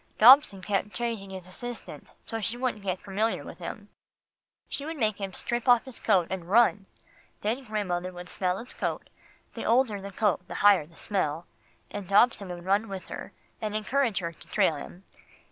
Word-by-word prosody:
Dobson 230 -5 +8
kept 205 +1 -1
changing 230 -5 -3
his 190 -2 -8
assistant, 240 +6 -8
so 225 0 -4
she 225 +4 -1
wouldn't 245 -4 -1
get 190 -2 -2
familiar 210 +3 -1
with - - -10
him. - - -7 0.8
He 280 - -5
would 320 +2 -5
make 215 -5 0
him 195 -1 -3
strip 240 +6 -3
off 245 -2 +6
his 260 -3 -4
coat, 190 -6 +3
and 180 -2 -4
run. 210 -2 +4 0.5
Then 230 +6 -1
grandmother 185 -5 -2
would 180 0 -9
smell 180 0 -1
his 240 +5 -7
coat, - - -3 0.4
the - - -5
older 230 -4 +2
the 200 - -6
coat 195 -3 0
the - - -7
higher 200 -7 +5
the 165 - -20
smell, 170 -5 -1 0.5
and 205 -3 -6
Dobson 200 0 +4
would 175 -1 -7
run 200 +4 +2
with 190 -1 -6
her, - - -7 0.3
and 215 -1 -2
encourage 230 +1 +1
her 170 -2 -1
to 165 - -14
trail - - +3
him. 175 +6 -10
205 Hz, 185 wpm, -28 LUFS, 185-230 Hz, 0.8 s, Dobson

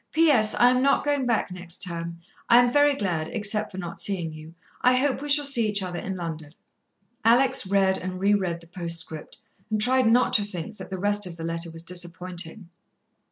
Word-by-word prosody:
"P.S. 290 -10 +4
I 245 +1 +5
am 255 0 +1
not 275 +1 +2
going 285 -3 0
back 230 -5 0
next 175 0 -1
term. 170 -2 -5 0.3
I 235 - +7
am 245 0 +4
very 290 0 +4
glad, 170 -9 -2
except 210 0 0
for 190 - -10
not 175 -2 -6
seeing 175 -5 0
you. 155 +1 -12 0.3
I 250 0 +4
hope 270 +1 0
we 295 - -6
shall 290 +1 +4
see 240 -6 +3
each 205 -1 0
other 175 -1 -5
in 190 +1 -5
London." 160 -3 -7 0.7
Alex 245 0 +3
read 190 -1 +2
and 185 0 -5
re 200 +2 +3
read 180 -4 -1
the 170 - -16
postscript, 165 -3 -5 0.3
and 215 -1 -1
tried 255 +2 +3
not 245 +2 +3
to 205 - +4
think 200 +1 -7
that 185 - -9
the 190 - -5
rest 205 +1 0
of 170 -1 -9
the 165 - -7
letter 165 +1 -3
was 165 0 -9
disappointing. 175 +1 -5
190 Hz, 205 wpm, -25 LUFS, 170-240 Hz, 0.7 s, I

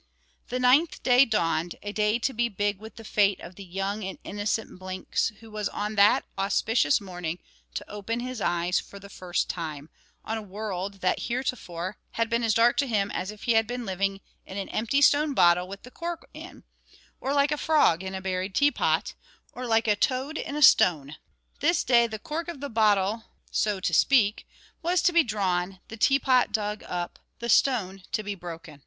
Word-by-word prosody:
_ - - -31
The 250 - -2
ninth 265 +6 +3
day 250 +1 +6
dawned, 170 -6 0
a 205 - -4
day 210 +1 +2
to 255 +3 -1
be 235 +1 0
big 205 -1 -1
with 220 +1 -11
the 225 - -11
fate 200 -2 +2
of 170 - -10
the 195 - -10
young 195 +3 -3
and 190 0 -5
innocent 205 -1 -3
Blinks, 185 0 -2
who 225 -1 -13
was 210 -1 -2
on 210 +1 -3
that 205 0 +4
auspicious 195 - +2
morning 180 -4 -5 0.4
to - - -5
open 210 +3 -4
his 250 -2 -5
eyes 175 0 +1
for 200 - -11
the 200 0 -12
first 180 -1 -2
time, 155 -3 -5 0.3
on 225 0 -2
a - - -7
world 200 -1 -5
that, 185 - +1
heretofore, 210 -7 -3 0.2
had 230 0 -1
been 235 +1 +2
as 225 -2 +2
dark 235 +1 +4
to 280 - +2
him 205 -4 0
as 190 - -3
if 210 -1 -9
he 235 - +1
had 225 -1 +3
been 245 0 -4
living 195 +1 -2 0.2
in 190 - -9
an 195 - -4
empty 255 +6 +1
stone 290 0 +4
bottle 175 -1 +4
with 195 +1 -9
the 250 - -12
cork 340 +3 -6
in, - - -11 0.6
or 270 - -2
like 280 +1 +3
a - - +2
frog 300 - +3
in 190 0 -5
a 190 - -5
buried 190 0 -3
teapot, 290 -2 +2 0.4
or 250 0 -6
like 225 0 +2
a 210 - +4
toad 260 +7 -1
in 290 - -4
a 300 - +1
stone. 155 - +5 0.4
This 325 +3 +2
day 235 -2 +4
the 220 -1 -5
cork 315 +9 -5
of 340 -5 -6
the 285 +1 -5
bottle 215 -1 +2 0.3
so 210 -2 0
to 180 - -1
speak 215 +1 +3 0.3
was 350 0 +1
to 355 - +3
be 340 - +6
drawn, 190 -5 -1
the 225 - -7
teapot 260 +1 +3
dug 210 -1 -2
up, 175 -1 -4 0.2
the 235 0 -5
stone 195 -10 +2
to 215 - 0
be 205 0 -3
broken. 165 -5 -9
210 Hz, 200 wpm, -26 LUFS, 190-245 Hz, 0.6 s, day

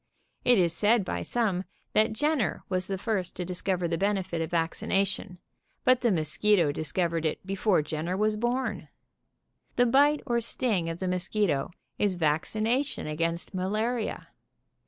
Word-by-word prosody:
It 245 -1 +5
is 170 -3 +3
said 210 +3 +3
by - - -3
some 205 -7 0 0.3
that 220 +1 +3
Jen 295 +6 +1
ner 215 - -1
was 185 0 0
the 195 - -2
first 195 -3 -2
to 180 - -4
discover 180 0 -1
the 165 -1 -2
benefit 190 -4 0
of 160 - -2
vaccina 170 +3 +1
tion, 190 -1 -6 0.5
but 255 0 +4
the 240 - +3
mosquitp 170 -1 +2
discovered 165 +2 -1
it 155 +3 -2
"before 195 -3 +1
Jenner 160 +4 -3
was 215 +1 +2
born. 240 +4 -2 0.9
The 245 - +4
bite 285 +5 +4
or 235 -1 +1
sting 215 -7 0
of 165 - -4
the 185 - -3
mosquito 180 -4 0 0.3
is 200 -3 +2
vaccination 215 - 0
against 165 +4 -2
malaria. 215 +5 -2
190 Hz, 155 wpm, -28 LUFS, 170-220 Hz, 0.9 s, It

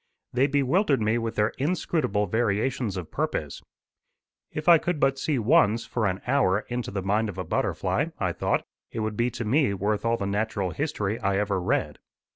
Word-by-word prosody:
They 130 +3 +3
bewildered 145 +3 +2
me 110 +2 +1
with 115 -1 -3
their 105 +1 +2
inscrutable 145 - 0
variations 110 +1 0
of 90 -3 -6
purpose. - - -2 0.9
"If 155 +2 -5
I 170 -2 +8
could 175 -2 -2
but 135 -1 +2
see 150 -1 0
once, 110 0 +3
for 115 -4 -1
an 95 +1 -2
hour, 125 -7 +2
into 120 0 -3
the 95 -1 -3
mind 105 +3 +1
of 95 - -7
a 90 - -2
butterfly," - - 0
I - - -1
thought, - - 0 0.3
"it 115 - -4
would 110 -1 -2
be 120 +3 +1
to 120 -1 -5
me 125 -2 +2
worth 105 +2 -1
all 115 0 +1
the 100 - -3
natural 100 -2 -1
history 110 - -2
I 100 -2 0
ever 100 -2 0
read. - - -1
110 Hz, 190 wpm, -26 LUFS, 100-135 Hz, 0.9 s, I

